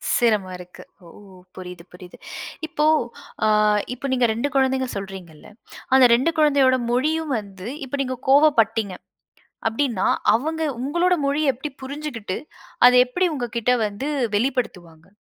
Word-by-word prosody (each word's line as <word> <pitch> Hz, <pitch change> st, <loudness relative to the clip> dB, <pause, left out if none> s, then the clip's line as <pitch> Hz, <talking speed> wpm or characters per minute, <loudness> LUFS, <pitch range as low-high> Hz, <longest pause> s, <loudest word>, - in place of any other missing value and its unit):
சிரம 215 Hz, -5 st, +2 dB
இருக்கு. 180 Hz, 0 st, -13 dB, 0.2 s
ஓ! -, -, -15 dB, 0.5 s
புரியுது, 180 Hz, -2 st, -9 dB
புரியுது. 180 Hz, 0 st, -13 dB, 0.5 s
இப்போ, 305 Hz, -2 st, -1 dB, 0.6 s
ஆ -, -, +3 dB, 0.5 s
இப்ப 260 Hz, +3 st, -5 dB
நீங்க 250 Hz, -1 st, +2 dB
2 235 Hz, +6 st, -1 dB
கொழந்தைங்க 265 Hz, -1 st, +1 dB
சொல்றீங்கள்ல. 190 Hz, -5 st, -9 dB, 0.5 s
அந்த 265 Hz, -1 st, +7 dB
2 260 Hz, +7 st, +1 dB
கொழந்தையோட 280 Hz, -4 st, +4 dB
மொழியும் 305 Hz, +4 st, 0 dB
வந்து, 195 Hz, -1 st, -10 dB, 0.2 s
இப்ப 265 Hz, -, -5 dB
நீங்க 260 Hz, -1 st, -2 dB
கோவப்பட்டீங்க. 225 Hz, -9 st, +3 dB, 0.7 s
அப்டின்னா, 225 Hz, -3 st, 0 dB, 0.3 s
அவங்க 315 Hz, +8 st, -1 dB, 0.2 s
உங்களோட 345 Hz, +7 st, +1 dB
மொழிய 285 Hz, 0 st, +1 dB
எப்டி 270 Hz, +5 st, -6 dB
புரிஞ்சுகிட்டு, 265 Hz, -8 st, -5 dB, 0.5 s
அத 250 Hz, -, +9 dB
எப்படி 360 Hz, +9 st, -1 dB
உங்க 260 Hz, -5 st, -3 dB
கிட்ட 235 Hz, +2 st, +1 dB
வந்து 210 Hz, +7 st, -5 dB, 0.3 s
வெளிப்படுத்துவாங்க? 190 Hz, -9 st, -3 dB
250 Hz, 125 wpm, -22 LUFS, 200-280 Hz, 0.7 s, அத